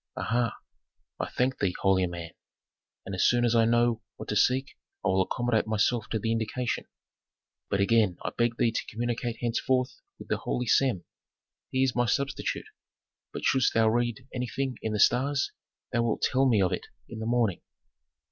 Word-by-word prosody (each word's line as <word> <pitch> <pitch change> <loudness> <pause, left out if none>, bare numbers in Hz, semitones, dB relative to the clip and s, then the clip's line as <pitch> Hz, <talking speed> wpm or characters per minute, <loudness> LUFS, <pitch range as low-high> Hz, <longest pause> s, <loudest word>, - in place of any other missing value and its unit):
"Aha! 115 -1 0 0.6
I - - -2
thank 130 +1 0
thee, 95 -3 0
holy 95 -1 +3
man. 85 -1 -7 0.7
And 95 - -6
as 95 - +1
soon 120 0 +4
as 120 - +2
I 115 -1 +5
know 120 0 +2
what - - -9
to 105 - -1
seek 130 +5 +2 0.3
I - - +3
will 95 0 +3
accommodate 115 +3 0
myself 110 +1 +1
to 110 - 0
the 115 +1 -1
indication. 115 +2 -2 0.8
But 100 - +1
again 105 -3 +3
I - - -1
beg 120 0 +1
thee 115 - +2
to - - -1
communicate 120 +1 -2
henceforth 125 - 0 0.2
with - - -11
the - - +1
holy 125 - -2
Sem. 120 -6 +2 0.6
He 130 0 +1
is 130 -2 +1
my 120 0 +2
substitute, 135 +5 -1 0.7
but - - -6
shouldst 130 -2 +3
thou 110 -1 +5
read 120 +2 -1
anything 125 0 -2
in 110 - -2
the 105 - -1
stars 135 +6 +3 0.4
thou 120 - +2
wilt 115 -2 -1
tell 135 +1 +3
me 105 -5 +4
of 90 - +1
it - - -4 0.2
in 115 - -8
the 110 - -3
morning." 115 -5 +1
115 Hz, 180 wpm, -28 LUFS, 110-125 Hz, 0.8 s, I